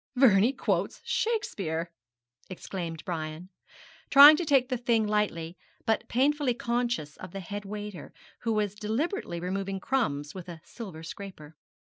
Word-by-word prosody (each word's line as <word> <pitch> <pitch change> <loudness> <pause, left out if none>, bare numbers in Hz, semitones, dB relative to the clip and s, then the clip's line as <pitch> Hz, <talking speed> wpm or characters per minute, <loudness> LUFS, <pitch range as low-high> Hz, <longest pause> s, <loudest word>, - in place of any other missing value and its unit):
'Vernie 235 -3 +5
quotes 200 -8 -1
Shakespeare,' 195 - -1 0.6
exclaimed 170 -3 -6
Brian, 160 +1 -5 0.6
trying 285 +2 +11
to 345 - -2
take 270 -4 +3
the 255 - 0
thing 230 -2 +2
lightly, 185 -5 -1 0.3
but 225 - 0
painfully 275 0 +2
conscious 235 -11 -2
of 185 -1 -10
the 195 - -4
head 205 +3 -6
waiter, 205 -4 -7 0.3
who 230 - -1
was 210 -2 0
deliberately 220 - -2
removing 195 +2 -3
crumbs 150 - -1
with 185 -2 -8
a 170 -2 -8
silver 185 -9 -9
scraper. 165 -4 -9
205 Hz, 135 wpm, -28 LUFS, 170-245 Hz, 0.6 s, trying